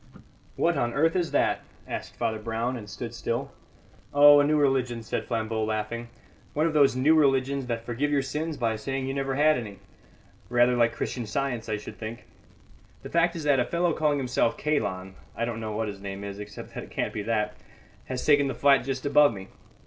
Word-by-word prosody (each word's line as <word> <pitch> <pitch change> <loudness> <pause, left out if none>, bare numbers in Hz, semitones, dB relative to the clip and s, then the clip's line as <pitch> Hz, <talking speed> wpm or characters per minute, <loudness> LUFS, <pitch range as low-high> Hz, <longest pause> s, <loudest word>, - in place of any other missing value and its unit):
"What 170 0 +1
on 120 -1 -1
earth 165 +4 +2
is 175 -3 +1
that?" - - +1 0.3
asked - - -6
Father 110 -1 -1
Brown, 115 +3 -2
and 105 -4 -8
stood - - -6
still. - - -3 0.6
"Oh, 145 0 +8
a - - +5
new 150 +1 +2
religion," 130 -5 +1
said - - -3
Flambeau, 110 -1 -2
laughing; 110 +2 -3 0.5
"one 155 +2 +2
of 165 - 0
those 140 -4 +4
new 135 +5 +4
religions 135 -3 +2
that 115 -1 -3
forgive 125 +5 -1
your 145 -2 +1
sins 155 +3 -3
by 115 -2 0
saying 135 +4 -3
you 135 - -2
never 135 -1 -2
had 150 -1 +4
any. 105 -4 -8 0.7
Rather 120 0 +4
like 115 -1 +2
Christian 120 -1 -3
Science, 120 0 -2
I 110 - 0
should 105 - -10
think. 115 +1 -7 0.8
The - - -7
fact 170 +1 +2
is 165 - -5
that 145 -2 +3
a 125 - +2
fellow 170 0 +1
calling 150 -2 +1
himself 125 -3 0
Kalon 100 -11 -1 0.2
(I 115 - -1
don't 115 -1 -4
know 110 -1 -4
what 110 0 -1
his 100 -1 -7
name 100 0 -6
is, 100 0 -6
except 105 0 -9
that - - -5
it - - -17
can't - - -2
be 105 - -3
that) 105 -1 -1 0.5
has 130 -1 -4
taken 145 -2 +5
the 135 - -3
flat 140 -3 +4
just 135 0 -4
above 145 0 +5
me. 95 0 -9
125 Hz, 210 wpm, -27 LUFS, 110-145 Hz, 0.8 s, Oh